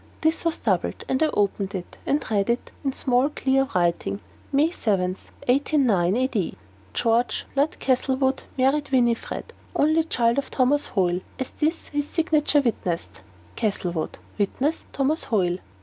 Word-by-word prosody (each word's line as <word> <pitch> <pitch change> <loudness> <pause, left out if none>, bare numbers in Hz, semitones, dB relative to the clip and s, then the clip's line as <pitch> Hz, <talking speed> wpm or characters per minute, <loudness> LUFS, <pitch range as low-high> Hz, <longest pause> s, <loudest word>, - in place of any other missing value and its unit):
This 320 +1 +1
was 335 -1 0
doubled, - - -1
and 260 - 0
I 315 - +5
opened 200 -1 0
it, 180 -2 -7
and 290 - +2
read, 215 +4 +2 0.2
in 275 - +1
small 260 +1 +2
clear 270 -2 +1
writing: 170 - +1 0.3
"May 290 +4 +3
7, 195 - 0 0.4
1809 245 - +3
A.D., 250 -8 0 0.4
George, 230 - +1
Lord 285 +3 +1
Castlewood, 265 0 +1 0.2
married 270 +3 +2
Winifred, 240 -3 0 0.2
only 315 +2 +3
child 235 -4 +2
of 280 - -5
Thomas 280 +3 +2
Hoyle, 180 -3 +1 0.2
as 260 - -4
this 320 +2 -1
his 290 -1 -2
signature 305 -3 +2
witnesseth. 170 - -2 0.4
"CASTLEWOOD. 180 -6 -2 0.2
"(Witness) 270 +10 0
THOMAS 285 +4 0
HOYLE." 180 -6 +1
255 Hz, 135 wpm, -24 LUFS, 200-285 Hz, 0.4 s, I